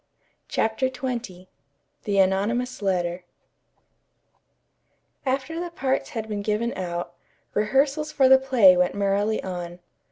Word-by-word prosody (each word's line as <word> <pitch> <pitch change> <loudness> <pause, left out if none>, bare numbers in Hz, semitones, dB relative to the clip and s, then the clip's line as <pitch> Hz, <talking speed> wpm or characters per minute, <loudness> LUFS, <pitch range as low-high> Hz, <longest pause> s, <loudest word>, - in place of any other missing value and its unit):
CHAPTER 225 +4 0
XX 245 -8 -5 0.6
THE 200 -1 0
ANONYMOUS 205 +7 +1
LETTER 180 -2 -1 2.0
After 270 +5 -1
the 350 0 -4
parts 270 -5 -1
had 220 -1 -3
been 210 -2 -3
given 215 +3 -1
out, 175 -1 -4 0.4
rehearsals 275 +8 +1
for 270 -3 +4
the 265 0 +7
play 245 -9 +6
went 180 +1 +1
merrily 200 +2 0
on. 175 -2 -6
215 Hz, 115 wpm, -24 LUFS, 190-260 Hz, 2.0 s, the